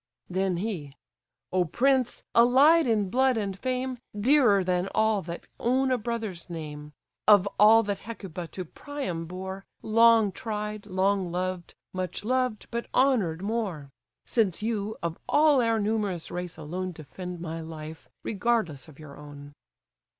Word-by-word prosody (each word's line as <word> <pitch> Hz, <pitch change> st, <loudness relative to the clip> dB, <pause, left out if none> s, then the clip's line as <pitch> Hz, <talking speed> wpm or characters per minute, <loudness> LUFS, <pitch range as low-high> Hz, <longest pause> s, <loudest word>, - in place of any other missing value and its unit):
Then 185 Hz, -1 st, 0 dB
he: 170 Hz, -8 st, -4 dB, 0.6 s
"O 185 Hz, -1 st, +3 dB
prince! 255 Hz, -, +1 dB
allied 270 Hz, +7 st, +6 dB
in 210 Hz, -5 st, +1 dB
blood 260 Hz, -1 st, +3 dB
and 200 Hz, -3 st, -2 dB
fame, 255 Hz, 0 st, -2 dB, 0.2 s
Dearer 235 Hz, -5 st, +4 dB
than 180 Hz, 0 st, 0 dB
all 220 Hz, -2 st, +3 dB
that 170 Hz, 0 st, -7 dB
own 260 Hz, +2 st, +2 dB
a 255 Hz, -, +3 dB
brother's 220 Hz, -7 st, -4 dB
name; 150 Hz, -3 st, -7 dB, 0.4 s
Of 205 Hz, -2 st, +7 dB
all 220 Hz, +2 st, +7 dB
that 200 Hz, -2 st, -3 dB
Hecuba 190 Hz, -6 st, -7 dB
to 185 Hz, +2 st, -7 dB
Priam 180 Hz, -, -5 dB
bore, 190 Hz, +2 st, -6 dB, 0.2 s
Long 225 Hz, -1 st, +5 dB
tried, 210 Hz, -1 st, -5 dB
long 190 Hz, -1 st, +1 dB
loved: 180 Hz, 0 st, -3 dB, 0.2 s
much 185 Hz, +2 st, -4 dB
loved, 255 Hz, -2 st, 0 dB
but 235 Hz, 0 st, -3 dB
honoured 210 Hz, -11 st, +2 dB
more! 200 Hz, -10 st, -3 dB, 0.3 s
Since 210 Hz, -5 st, 0 dB
you, 215 Hz, -1 st, -2 dB
of 170 Hz, -1 st, -3 dB
all 295 Hz, -3 st, +5 dB
our 230 Hz, -1 st, +2 dB
numerous 205 Hz, -5 st, -1 dB
race 180 Hz, -2 st, -5 dB
alone 180 Hz, +4 st, -4 dB
Defend 170 Hz, +4 st, -8 dB
my 165 Hz, -1 st, -5 dB
life, 160 Hz, 0 st, -9 dB
regardless 195 Hz, -, -1 dB
of 150 Hz, -3 st, -15 dB
your 150 Hz, -3 st, -11 dB
own." 145 Hz, -1 st, -11 dB
200 Hz, 145 wpm, -27 LUFS, 175-230 Hz, 0.6 s, Of